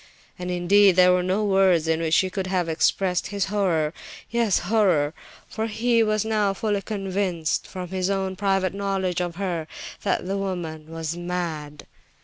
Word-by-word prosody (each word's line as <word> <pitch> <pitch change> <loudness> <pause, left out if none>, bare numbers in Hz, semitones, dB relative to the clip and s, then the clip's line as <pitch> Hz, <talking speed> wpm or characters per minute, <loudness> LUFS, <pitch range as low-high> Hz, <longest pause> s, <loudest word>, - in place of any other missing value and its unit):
And, 180 0 -4
indeed, 185 +2 +4
there 180 0 +6
were 180 0 +3
no 190 +4 0
words 190 -5 +3
in 160 0 +1
which 160 -1 +2
he 185 -1 +1
could 190 -1 -3
have 185 -2 0
expressed 180 +3 +1
his 200 -1 -1
horror, 170 -7 +1 0.4
yes, 230 -4 +2
horror, 180 -8 +2 0.3
for 220 0 -3
he 230 +1 +2
was 215 -1 +1
now 210 -3 +1
fully 205 -1 -1
convinced 195 -5 -2
from 180 -2 -7
his 185 0 -1
own 190 -1 -1
private 195 -1 0
knowledge 195 -3 -1
of 175 -1 -3
her, 175 -4 -3 0.3
that 195 -2 -1
the 195 +2 -2
woman 165 -5 -4
was 165 0 -4
mad. 170 -4 -4
185 Hz, 165 wpm, -24 LUFS, 175-200 Hz, 0.4 s, there